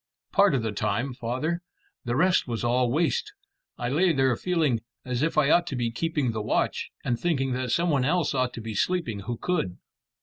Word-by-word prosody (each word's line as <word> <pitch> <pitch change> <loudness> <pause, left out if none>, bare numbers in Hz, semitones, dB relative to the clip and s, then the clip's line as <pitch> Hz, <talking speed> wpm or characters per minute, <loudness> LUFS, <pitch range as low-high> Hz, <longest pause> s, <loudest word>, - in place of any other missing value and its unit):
"Part 200 -7 +4
of 125 - 0
the 110 - -1
time, 110 +6 -1
father. 130 +9 -2 0.4
The 120 0 -1
rest 180 +3 +3
was 115 -2 -3
all 120 +1 +2
waste, 425 - 0 0.4
and 120 +1 -2
I - - 0
lay 180 +2 +4
there 135 -4 +2
feeling 155 -7 +1 0.3
as 125 -1 -2
if 160 +1 0
I 150 -1 +4
ought 175 0 +4
to 140 - -3
be 120 -2 -1
keeping 145 0 -1
the 110 -1 -3
watch, 105 - 0 0.2
and 120 -1 0
thinking 135 -6 0
that 125 0 -2
some 170 +4 +2
one 140 -3 +2
else 165 +3 +1
ought 130 -2 +1
to 115 - -6
be 110 0 -5
sleeping 150 - 0
who 115 +4 -4
could." 130 - -1
130 Hz, 210 wpm, -26 LUFS, 120-165 Hz, 0.4 s, Part